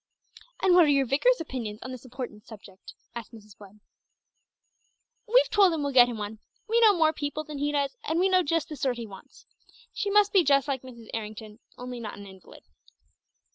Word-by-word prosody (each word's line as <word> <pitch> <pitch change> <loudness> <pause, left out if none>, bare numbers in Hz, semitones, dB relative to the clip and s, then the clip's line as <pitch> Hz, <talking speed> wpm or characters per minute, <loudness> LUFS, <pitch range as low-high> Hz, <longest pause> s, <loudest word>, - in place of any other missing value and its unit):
"And 375 - +5
what 350 -2 +7
are 295 - +3
your 275 -1 +3
vicar's 295 - +2
opinions 235 -9 -6
on 255 - -7
this 255 0 -9
important 245 -4 -8
subject?" 200 -3 -13 0.2
asked 235 -3 -8
Miss 210 -3 -14
Webb. 205 +1 -16 1.5
"We've - - +5
told 395 -3 +5
him 310 -3 -2
we'll 280 -1 -2
get 245 -2 +7
him 235 - -5
one. 210 +1 -6 0.3
We 460 +2 +2
know 425 -4 +6
more 315 -1 +3
people 295 0 -4
than 300 -2 -8
he 290 +1 0
does, 285 - -1
and 335 -6 -1
we 375 - +3
know 370 -1 +3
just 330 0 -1
the 305 - -6
sort 255 -3 -1
he 235 - -6
wants. 195 -3 -15 0.5
She 405 - -2
must 410 0 +3
be 380 -3 +5
just 275 -2 +3
like 270 -3 -2
Mrs. 235 -3 -13
Errington, 215 0 -7 0.2
only 250 0 -7
not 215 -4 -7
an 200 - -10
invalid." 190 -1 -15
265 Hz, 205 wpm, -27 LUFS, 220-325 Hz, 1.5 s, what